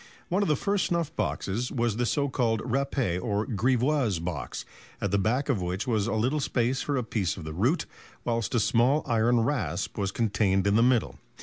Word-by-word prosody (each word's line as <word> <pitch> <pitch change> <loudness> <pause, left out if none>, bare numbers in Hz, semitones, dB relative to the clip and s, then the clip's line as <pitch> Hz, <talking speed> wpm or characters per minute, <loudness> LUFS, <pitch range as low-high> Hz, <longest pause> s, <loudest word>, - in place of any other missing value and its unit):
One 185 +4 +1
of 200 - +1
the 150 - +4
first 200 +5 0
snuff 165 -2 -1
boxes 115 +6 -2
was 120 -3 0
the 120 0 +1
so 145 +2 +1
called 115 -5 0
râpé 130 -8 -1
or 105 +1 -1
grivoise 125 - +1
box, 80 -5 -5 0.3
at 100 - -2
the 100 - +2
back 125 +8 0
of 125 -10 +1
which 90 +5 -2
was 110 -4 0
a 115 - -1
little 125 +8 +1
space 130 -1 0
for 145 -1 -1
a 125 - 0
piece 105 -7 -1
of 90 - -7
the 80 0 -6
root, 120 - +1 0.4
whilst 115 -3 -1
a - - +4
small 125 +7 +3
iron 115 +1 +3
rasp 115 - -2
was 100 -1 0
contained 95 -4 +1
in 100 0 +3
the 115 - +5
middle. 115 - +2
115 Hz, 205 wpm, -27 LUFS, 100-135 Hz, 0.4 s, the